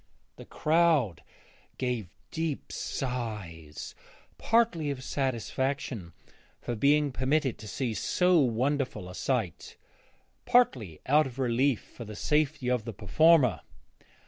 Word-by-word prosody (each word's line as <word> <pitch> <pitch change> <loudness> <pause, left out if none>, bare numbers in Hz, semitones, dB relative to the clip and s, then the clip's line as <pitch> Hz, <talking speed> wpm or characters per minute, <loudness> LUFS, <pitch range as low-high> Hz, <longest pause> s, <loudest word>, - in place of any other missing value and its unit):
The - - -10
crowd 155 - +2 0.6
gave 125 -7 -2 0.2
deep 160 -3 -3
sighs, 105 - -5 0.5
partly 225 -10 +2
of 135 -2 -4
satisfaction 130 - -2 0.5
for 120 - -4
being 145 +4 +3
permitted 130 +1 0
to 110 - -9
see 120 +1 -2
so 180 - +3
wonderful 130 -4 0
a 90 - -9
sight, 110 - -2 0.7
partly 120 - +2
out 150 +2 +4
of 125 -1 -11
relief 130 0 +1
for 120 - -11
the 105 0 -8
safety 150 +2 0
of 125 -3 +1
the 115 - -5
performer. 125 - +4
130 Hz, 115 wpm, -29 LUFS, 110-150 Hz, 0.7 s, out